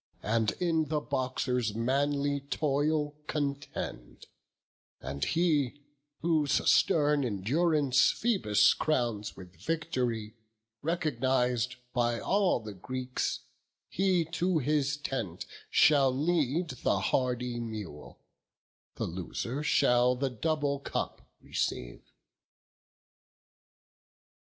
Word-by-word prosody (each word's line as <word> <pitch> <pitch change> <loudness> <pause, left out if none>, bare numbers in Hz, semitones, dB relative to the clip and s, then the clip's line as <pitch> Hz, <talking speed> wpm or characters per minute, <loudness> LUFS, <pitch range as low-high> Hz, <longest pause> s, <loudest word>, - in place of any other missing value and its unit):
And 110 -1 +1
in 165 -3 +1
the 150 +1 0
boxer's 125 -5 -1
manly 140 +4 +1
toil 150 +1 +1 0.2
contend; 140 - -4 0.7
And 70 0 -5
he, 145 - +1 0.4
whose 155 -4 +2
stern 150 -2 +4
endurance 140 - +2
Phoebus 105 - +3
crowns 120 -8 -1
With 90 -1 -12
vict'ry, 125 - -2 0.5
recogniz'd 130 -6 0 0.2
by 120 -2 +1
all 195 -7 +2
the 110 -2 -8
Greeks, 125 +6 -3 0.5
He 185 -3 +2
to 170 +2 0
his 150 0 +1
tent 115 - -4 0.2
shall 140 -3 +5
lead 155 +3 0
the - - +2
hardy 125 +3 0
mule; 105 -10 -7 0.8
The - - -2
loser 95 - -4
shall 125 -4 +3
the 135 +1 -1
double 145 +2 -1
cup - - -4
receive." - - -3
135 Hz, 90 wpm, -30 LUFS, 120-155 Hz, 0.8 s, shall